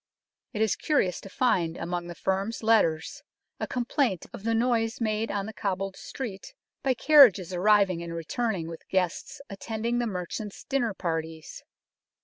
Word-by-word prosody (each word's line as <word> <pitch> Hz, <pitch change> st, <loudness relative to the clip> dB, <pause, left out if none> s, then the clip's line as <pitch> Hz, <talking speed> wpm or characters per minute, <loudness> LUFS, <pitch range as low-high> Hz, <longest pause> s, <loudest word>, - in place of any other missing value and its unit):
It 215 Hz, -, +1 dB
is 220 Hz, -, +1 dB
curious 235 Hz, -, 0 dB
to 195 Hz, -, -10 dB
find 175 Hz, -8 st, +1 dB
among 175 Hz, +1 st, -3 dB
the 175 Hz, -, -7 dB
firm's 195 Hz, +6 st, -2 dB
letters 165 Hz, -8 st, +2 dB, 0.4 s
a -, -, -2 dB
complaint 245 Hz, -, 0 dB
of -, -, -8 dB
the 230 Hz, 0 st, +1 dB
noise 230 Hz, -1 st, +1 dB
made 220 Hz, -1 st, 0 dB
on 200 Hz, -1 st, -2 dB
the 220 Hz, -, -7 dB
cobbled 195 Hz, -2 st, -2 dB
street 250 Hz, -, -7 dB, 0.3 s
by 265 Hz, -2 st, +1 dB
carriages 240 Hz, -, +6 dB
arriving 190 Hz, -1 st, +3 dB
and 170 Hz, 0 st, -6 dB
returning 175 Hz, +1 st, -2 dB
with 165 Hz, -1 st, -10 dB
guests 190 Hz, -, -1 dB
attending 225 Hz, +3 st, -3 dB
the 240 Hz, -, 0 dB
merchant's 195 Hz, +1 st, -5 dB
dinner 245 Hz, -7 st, -1 dB
parties. 160 Hz, -3 st, -4 dB
205 Hz, 150 wpm, -27 LUFS, 180-230 Hz, 0.4 s, carriages